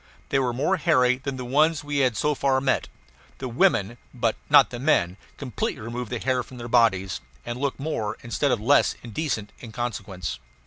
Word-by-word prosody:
They 135 - +2
were 130 -2 +1
more 145 +10 +1
hairy 125 -4 +3
than 135 0 -4
the 125 - -5
ones 150 +5 +2
we 145 0 -3
had 130 -5 +2
so 150 - +1
far 135 -1 +1
met. 130 0 0 0.5
The 130 - -5
women, 115 -2 +1 0.2
but - - +1
not - - +7
the 120 - -5
men, 105 - +2 0.2
completely 130 -7 -3
remove 120 +1 -5
the 125 - -2
hair 130 +1 0
from 125 +1 -11
their 120 0 -6
bodies 105 -6 +2 0.2
and 120 +1 -4
look 140 0 -2
more, 110 -8 -3
instead 120 +4 0
of 125 -4 +1
less, 135 +7 +3
indecent 115 -3 -3
in 115 - -10
consequence. 100 -7 -4
125 Hz, 190 wpm, -25 LUFS, 115-140 Hz, 0.5 s, not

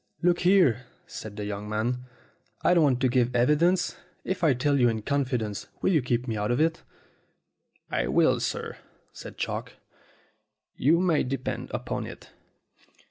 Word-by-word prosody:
"Look 175 0 +3
here," 175 - +3 0.2
said 105 -2 -8
the 105 - -4
young 105 0 -5
man, 120 +4 -2 0.6
"I - - +5
don't 170 - +4
want 130 -3 +2
to 130 - +4
give 125 0 +1
evidence. 165 +8 +2 0.3
If 185 -1 -3
I 150 -5 +4
tell 140 +3 +1
you 120 -1 +5
in 110 -2 -3
confidence 125 -7 -1
will - - +1
you 160 -5 +3
keep 120 0 -1
me 115 - -2
out 105 0 -1
of 120 - +1
it?" 165 +1 +1 1.1
"I - - 0
will, 65 - +3
sir," - - -4 0.3
said - - -10
Chalk. - - -4 1.0
"You 160 +6 +3
may 175 -4 +2
depend 130 0 -3
upon - - -3
it." - - -12
125 Hz, 160 wpm, -27 LUFS, 115-160 Hz, 1.1 s, I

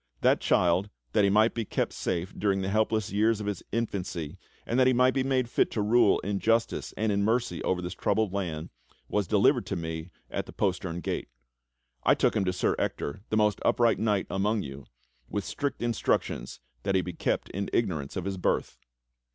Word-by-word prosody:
That - - +4
child, 90 +3 +2 0.2
that 105 - +4
he 100 - +4
might 110 +3 +4
be 115 - -2
kept - - -2
safe 90 +1 -2
during 100 -2 0
the 95 - -1
helpless 110 0 +1
years 110 +2 +2
of 105 - -4
his 105 -3 -3
infancy 95 -9 -3 0.3
and 120 - 0
that 130 - +5
he 130 - +4
might 125 +1 +4
be 135 - +1
made 130 -2 +1
fit 120 - +2
to 110 - 0
rule 110 -1 +4
in 100 0 -2
justice 115 +2 +1
and 110 0 +1
in 100 0 +1
mercy 115 -4 0
over 90 -1 0
this 90 - -4
troubled 110 -3 0
land, 85 -5 -3 0.4
was 105 -3 0
delivered - - +3
to - - -2
me 80 0 -4 0.2
at - - -3
the - - -10
postern 90 -3 -1
gate. - - -3 0.7
I - - +4
took - - +2
him 95 - +1
to 90 - +1
Sir 90 - 0
Ector, 70 +7 -2
the 110 - +1
most 105 -2 +2
upright 115 -2 +3
knight 105 -3 +1
among 105 +2 +1
you, 70 -1 -8 0.4
with 105 - -2
strict 140 -4 -3
instructions 110 - -1 0.2
tl'iat 95 - 0
he 95 - +4
be 90 - -5
kept - - -1
in 100 +1 -3
ignorance 80 -11 -1
of 95 -2 -3
his 100 -1 -2
birth." 90 - -1
100 Hz, 200 wpm, -28 LUFS, 90-110 Hz, 0.7 s, that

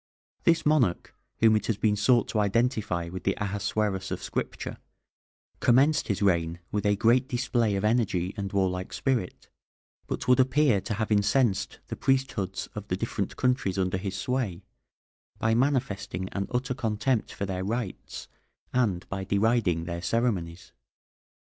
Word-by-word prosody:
This 170 -1 +3
monarch, 140 - +2 0.3
whom 110 -1 +6
it 105 - -1
has 115 - 0
been 105 -1 +2
sought 120 +3 +3
to 110 - 0
identify 105 -5 0
with 95 +1 -7
the 95 - +1
Ahasuerus 100 -1 -1
of - - -4
Scripture, - - -4 0.8
commenced 140 +6 +4
his 100 -1 -1
reign 85 -3 +2
with 105 0 0
a 105 - +3
great 120 +5 +3
display 120 -4 0
of 100 +2 -1
energy 105 -5 +1
and 100 -3 -4
warlike 95 -2 -1
spirit, 125 -9 -2 0.6
but - - -4
would 125 0 +5
appear 130 -4 +3
to 105 - -3
have 110 +1 -2
incensed 105 +1 +1
the - - -3
priesthoods 130 -8 0
of 105 -1 -7
the 90 - -1
different 100 -2 -3
countries 125 -7 +1
under 95 0 0
his 95 0 -4
sway 105 -5 -2 0.7
by 110 0 +1
manifesting 105 -8 0
an 100 -1 -3
utter 125 +1 -1
contempt 110 0 -1
for 100 - -4
their 95 -1 -3
rites, 110 0 -4 0.5
and 105 -8 +1
by 95 0 -4
deriding 100 -3 +1
their 85 0 -4
ceremonies. 95 -5 -1
105 Hz, 150 wpm, -27 LUFS, 95-125 Hz, 0.8 s, whom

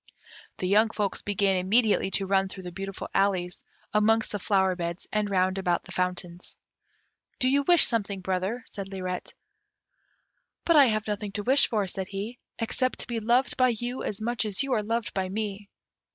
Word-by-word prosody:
The 185 - -2
young 215 +4 +4
folks 205 -3 -2
began 200 -1 +1
immediately 210 +3 +2
to 195 - -3
run 195 0 +1
through 190 0 -9
the 180 - -7
beautiful 195 +2 -6
alleys, 185 -3 0 0.3
amongst 220 +1 +3
the 205 - -3
flower 190 -1 +2
beds 170 0 -4
and 210 -1 0
round 185 0 +1
about 175 -2 0
the - - -13
fountains. 180 -1 -4 0.8
"Do 255 - +1
you 280 +2 +3
wish 345 +4 +6
something, 200 -4 -1
brother," 190 +6 -2
said 195 -2 -7
Lirette. 185 -2 -5 1.3
"But 335 - +4
I 285 -2 +8
have 215 -3 0
nothing 205 -1 -4
to 205 - -3
wish 265 +5 +6
for," 215 -4 0
said 190 0 -4
he; 205 +5 -6 0.2
"except 255 +2 -1
to - - -6
be 235 -1 -2
loved 240 +4 +1
by 255 -1 +4
you 245 +2 -4
as 200 - -4
much 235 +2 -1
as 210 +4 -1
you 275 -1 -1
are 220 - +2
loved 225 +2 -2
by 190 -1 -2
me." 205 0 -4
205 Hz, 185 wpm, -27 LUFS, 190-225 Hz, 1.3 s, I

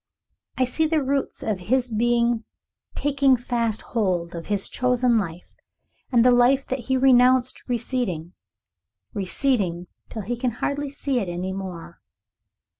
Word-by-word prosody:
I 260 - +3
see 315 +6 0
the 310 -2 +1
roots 275 +1 -2
of 215 -4 -1
his 255 -1 +1
being 235 +1 +1 0.5
taking 275 -2 +2
fast 235 -2 -1
hold 180 -7 0
of 170 -1 -7
his 205 -2 0
chosen 250 -2 +2
life, 175 -3 -6 0.6
and 240 -2 +4
the 250 - +7
life 245 +3 +4
that 260 - -3
he 260 - +3
renounced 255 -1 +4
receding, 225 -9 -2 0.8
receding 190 -3 0 0.2
till 220 - -6
he 240 +5 -3
can 245 -1 -1
hardly 285 +4 -2
see 275 -2 -2
it 195 -6 -3
any 180 +2 -3
more. 180 -3 -8
240 Hz, 140 wpm, -24 LUFS, 195-260 Hz, 0.8 s, the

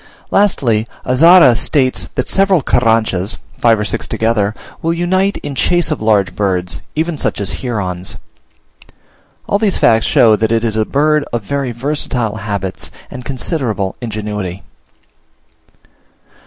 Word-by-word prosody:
Lastly, 120 - +2 0.2
Azara 140 0 +6
states 130 +2 0
that 125 - -1
several 195 -5 +2
Carranchas, 110 -5 +1 0.2
five 115 -1 +4
or 105 - -1
six - - -3
together, 110 -2 0 0.3
will 165 +1 0
unite 185 +3 +1
in 145 - -4
chase 175 +5 +1
of 155 - -2
large 105 -3 +2
birds, 90 -5 -1
even 160 -1 -1
such - - -1
as 100 -1 -4
herons. 95 -7 -4 1.3
All 200 - +1
these 210 -3 +1
facts 110 -1 +3
show 110 -3 +5
that 110 +1 -1
it 115 0 +1
is 110 -2 -1
a 110 0 +1
bird 150 +3 +2
of 120 -2 -2
very 135 +4 -2
versatile 120 -3 -2
habits 100 -3 -4 0.2
and 125 - -8
considerable 125 - -2
ingenuity. 105 -4 -5
115 Hz, 135 wpm, -15 LUFS, 105-150 Hz, 1.3 s, Azara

